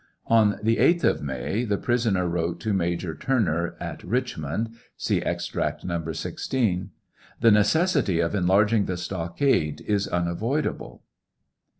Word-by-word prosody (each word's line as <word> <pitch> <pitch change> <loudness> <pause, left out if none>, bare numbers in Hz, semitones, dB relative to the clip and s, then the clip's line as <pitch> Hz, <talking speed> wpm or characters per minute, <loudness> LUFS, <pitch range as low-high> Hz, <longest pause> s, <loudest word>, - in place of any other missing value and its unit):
On 110 -3 +3
the 115 +1 +2
8th 170 0 +3
of - - +2
May 70 - -2
the 105 -4 0
prisoner 115 -7 +1
wrote 85 0 -2
to 105 +4 -1
Major 85 -2 -1
Turner 85 -8 0
at - - -6
Richmond, 115 - -2 0.3
(see - - 0
Ex - - -2
tract - - -3
No. 85 -2 -2
16) 95 +1 -2 0.5
The 115 - +5
necessity 110 - +3
of 85 +2 0
enlarging 100 +3 +3
the 90 - -3
stockade 85 - 0
is 100 -1 0
unavoidable. 105 - -2
100 Hz, 130 wpm, -25 LUFS, 85-115 Hz, 0.5 s, The